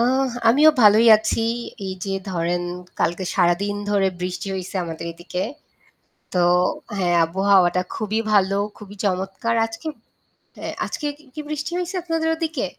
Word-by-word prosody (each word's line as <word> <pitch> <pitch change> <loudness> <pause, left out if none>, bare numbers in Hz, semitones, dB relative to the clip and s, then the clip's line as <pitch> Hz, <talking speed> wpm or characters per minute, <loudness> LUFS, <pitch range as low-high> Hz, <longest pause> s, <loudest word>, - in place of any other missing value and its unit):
আ - - +4 0.5
আমিও 295 +6 +7
ভালোই 215 +3 +7
আছি। 220 +1 -1 0.4
এই 190 - -3
যে 195 -1 -2 0.2
ধরেন 175 0 -1 0.4
কালকে 175 +3 0
সারাদিন 190 +3 +2
ধরে 195 -2 +3
বৃষ্টি 180 +2 -3
হইছে 190 +1 -5
আমাদের 165 0 -6
এদিকে। 175 +2 -5 0.9
তো 180 - +2 0.6
হ্যাঁ, 175 -2 +2
আবহাওয়াটা 185 0 +3
খুবই 215 0 -1
ভালো 195 -1 +3 0.2
খুবই 205 -1 -11
চমৎকার 195 +4 -1
আজকে 225 +7 -8 0.7
অ্যা - - -4 0.2
আজকে 300 - -4
কি 305 - -21
কি 305 - -5
বৃষ্টি 300 +1 -4
হইছে 360 +2 -3
আপনাদের 325 -1 -1
ওদিকে? 320 -4 -2
200 Hz, 140 wpm, -22 LUFS, 180-230 Hz, 0.9 s, আমিও